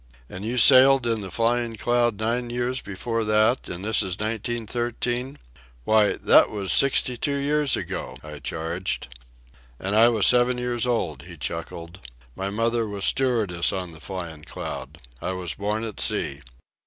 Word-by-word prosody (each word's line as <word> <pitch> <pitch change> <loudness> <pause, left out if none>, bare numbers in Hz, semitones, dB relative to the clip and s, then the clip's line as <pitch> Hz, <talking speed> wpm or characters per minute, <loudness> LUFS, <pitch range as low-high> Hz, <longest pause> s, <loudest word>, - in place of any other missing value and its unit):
"And 95 +6 -8
you 120 +3 -2
sailed 130 +1 +7
in 115 -2 0
the 95 - -6
Flying 115 +3 0
Cloud 120 -1 +1
nine 120 +2 -1
years 125 +2 -2
before 115 +4 -3
that, 110 +4 +2
and 90 +3 -6
this 110 0 +2
is 95 -3 -3
1913—why, 110 - -2
that - - +5
was 100 -4 -3
sixty 130 +4 +2
two 140 +3 -1
years 145 0 +1
ago," 65 0 -5
I 75 -1 -9
charged. 80 -4 -4 0.7
"And 100 +2 -2
I 115 +2 +7
was 110 -4 +2
seven 125 0 +4
years 125 0 -1
old," 85 - -1
he 85 -2 -11
chuckled. 85 +2 -6 0.4
"My 95 +1 -3
mother 115 +2 0
was 100 -2 -3
stewardess 110 -10 +1
on 90 -2 -4
the 80 - -14
Flyin' 85 -4 -7
Cloud. - - -7 0.2
I 95 - -2
was 90 -3 -4
born 105 +2 -2
at 110 -3 -6
sea. 70 +1 0
110 Hz, 155 wpm, -24 LUFS, 90-120 Hz, 0.7 s, sailed